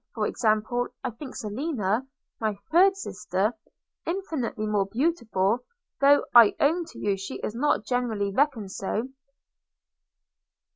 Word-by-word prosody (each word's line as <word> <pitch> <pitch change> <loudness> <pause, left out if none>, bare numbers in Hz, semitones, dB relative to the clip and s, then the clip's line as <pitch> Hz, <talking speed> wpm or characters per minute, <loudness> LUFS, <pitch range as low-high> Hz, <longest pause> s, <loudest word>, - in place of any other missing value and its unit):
For - - 0
example, 220 +2 +1 0.2
I 255 - -2
think 260 +4 -9
Selina, 225 - -2 0.3
my 215 -2 -1
third 380 +4 +5
sister, 210 - -1 0.5
infinitely 320 - -3
more 205 -2 +1
beautiful, 230 - +1 0.4
though 285 +1 +5
I 235 -4 +8
own 330 +4 +2
to 330 - -14
you 200 -1 0
she 195 +1 -6
is 210 - -3
not 245 -3 +1
generally 225 -5 -1
reckoned 250 -7 +1
so.' 215 +6 -3
235 Hz, 125 wpm, -26 LUFS, 210-285 Hz, 0.5 s, I